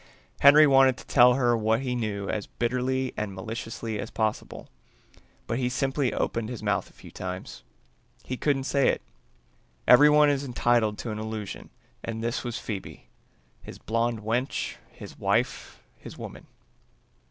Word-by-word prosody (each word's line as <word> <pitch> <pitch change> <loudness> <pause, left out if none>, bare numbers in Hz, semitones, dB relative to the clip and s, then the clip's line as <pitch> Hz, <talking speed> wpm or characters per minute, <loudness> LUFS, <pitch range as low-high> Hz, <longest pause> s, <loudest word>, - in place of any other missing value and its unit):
Henry 145 +2 +8
wanted 135 -2 +5
to - - -12
tell 125 -1 +5
her 120 -3 +2
what 110 +1 +1
he 130 -2 -2
knew 105 -4 -3
as 105 0 -3
bitterly 130 +2 -1
and 105 -2 -4
maliciously 110 +1 -5
as 110 - -5
possible, 110 -1 -3 0.8
but 115 - -2
he 125 -1 0
simply 135 +1 0
opened 115 -1 -2
his 120 -3 -7
mouth 100 -1 -1
a - - -23
few - - -14
times. - - -7 0.6
He 130 - -4
couldn't 135 0 0
say 140 0 +2
it. - - -1 0.8
Everyone 150 +3 +7
is 140 -1 -1
entitled 120 -4 +1
to 115 - -5
an 105 - -5
illusion 110 -2 -6 0.3
and 115 0 -5
this 115 0 -2
was 120 -1 -4
Phoebe, 105 -6 -7 0.5
his - - -10
blonde 115 0 -1
wench, 120 +5 -2
his - - -12
wife, - - -1 0.2
his - - -11
woman. - - -9
120 Hz, 155 wpm, -26 LUFS, 110-130 Hz, 0.8 s, Henry